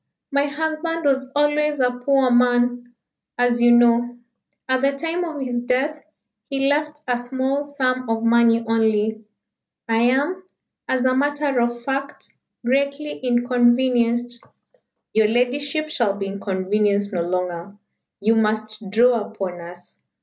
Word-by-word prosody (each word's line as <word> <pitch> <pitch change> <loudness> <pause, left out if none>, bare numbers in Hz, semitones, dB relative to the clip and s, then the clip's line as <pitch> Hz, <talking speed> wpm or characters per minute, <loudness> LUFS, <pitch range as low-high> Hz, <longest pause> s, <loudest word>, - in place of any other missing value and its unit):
My 280 +1 +1
husband 315 +2 -3
was 265 -2 +1
always 295 0 +1
a 250 -1 +2
poor 255 +1 +1
man, 245 0 +2 0.4
as 245 -1 +1
you 240 - +6
know. 240 0 +3 0.5
At 260 0 +1
the 275 +1 +2
time 330 +5 -3
of 320 -4 -5
his 245 -2 -2
death 265 +5 -1 0.5
he 275 0 0
left 295 +1 -1
a 245 -1 0
small 260 +3 -2
sum 255 -4 -2
of 225 0 -1
money 230 0 +3
only. 220 -1 +1 0.6
I 225 0 +1
am, 280 +10 +1 0.5
as 260 -1 0
a 255 0 +3
matter 290 -1 0
of 240 0 -2
fact, 275 +2 -5 0.3
greatly 280 +3 -1
inconvenienced." 240 -1 +1 0.7
"Your 220 -1 +4
ladyship 280 +6 -1
shall 235 -9 0
be 200 -1 -4
inconvenienced 200 +1 -1
no 175 - 0
longer. 180 +2 -3 0.4
You 220 +3 +3
must 215 -1 -2
draw 235 +3 +3
upon 190 -5 -5
us. 175 +1 -13
245 Hz, 135 wpm, -21 LUFS, 225-280 Hz, 0.7 s, you